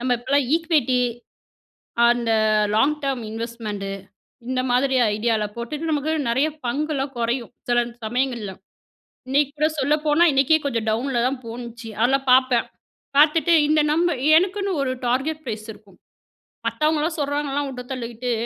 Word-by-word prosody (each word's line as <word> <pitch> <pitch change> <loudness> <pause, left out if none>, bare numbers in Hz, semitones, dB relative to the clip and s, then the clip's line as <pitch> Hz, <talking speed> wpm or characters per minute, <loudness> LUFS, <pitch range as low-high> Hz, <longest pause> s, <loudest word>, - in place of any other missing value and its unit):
நம்ம 250 0 +1
இப்போலாம் 265 +2 +1
ஈக்விட்டி, 305 -7 +1 1.1
அந்த 240 -1 +1 0.4
லாங் 275 +8 +3
டெர்ம் 270 -3 -2
இன்வெஸ்ட்மென்ட் 225 -3 -5 0.6
இந்த 255 0 0
மாதிரி 265 +2 +2 0.2
ஐடியால 220 -1 0
போட்டுட்டு 295 +7 -4
நமக்கு 300 +1 0 0.2
நிறைய 265 +6 +2 0.2
பங்குலாம் 280 +1 -2
குறையும், 235 +1 -2 0.2
சில 240 0 +3 0.2
சமயங்கள்ல. 235 -3 -2 0.8
இன்னைக்கு 280 +1 +2
கூட 305 +1 +3
சொல்லப்போனா, 300 +3 +2
இன்னைக்கே 275 +3 +4
கொஞ்சம் 230 -4 -1
டவுன்ல 240 +2 0
தான் 265 -1 -4
போனுச்சு. 235 0 -8
அதெல்லாம் 270 +3 +2
பார்ப்பேன். 255 -2 +4 0.5
பார்த்துட்டு, 320 +3 +4 0.2
இந்த 310 0 +3
நம்பர் 335 -3 +1 0.2
எனக்குன்னு 390 +3 +1
ஒரு 255 -1 -1
டார்கெட் 295 +6 -1
ப்ரைஸ் 215 -2 -5
இருக்கும். 205 -3 -20 0.7
மத்தவங்கல்லாம் 310 +1 0
சொல்றாங்கன்லாம் 285 0 -1
விட்டு 250 -2 -7
தள்ளிட்டு 240 -1 -4
265 Hz, 125 wpm, -22 LUFS, 235-295 Hz, 1.1 s, இன்னைக்கே